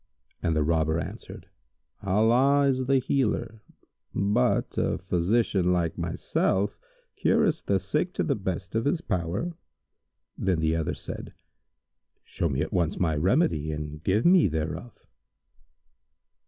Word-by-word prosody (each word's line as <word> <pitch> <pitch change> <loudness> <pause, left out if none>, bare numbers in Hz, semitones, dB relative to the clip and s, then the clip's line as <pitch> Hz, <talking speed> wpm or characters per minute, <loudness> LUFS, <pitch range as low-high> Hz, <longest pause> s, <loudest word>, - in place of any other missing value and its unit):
and 80 - 0
the 75 - +2
Robber 80 0 +1
answered, - - -8 0.5
"Allah 115 +8 +3
is 130 -1 0
the 135 0 +4
Healer; 120 -4 -1 0.5
but 105 +6 +1
a - - 0
physician 90 +1 +1
like 85 -2 0
myself 100 +2 -1 0.4
cureth - - +1
the - - +2
sick - - -1
to - - -1
the - - +1
best 95 -2 -4
of 115 +1 0
his 150 +4 +1
power." 95 - -2 0.8
Then 95 -4 0
the 80 0 +1
other 80 -2 -1
said, - - -8 0.9
"Show 85 - -2
me 65 0 -1
at - - -3
once 85 -4 0
my 80 -4 +1
remedy 80 - +1
and 75 0 -6
give 100 +5 +1
me 175 - +6
thereof." 80 +8 -5
95 Hz, 130 wpm, -27 LUFS, 80-120 Hz, 0.9 s, me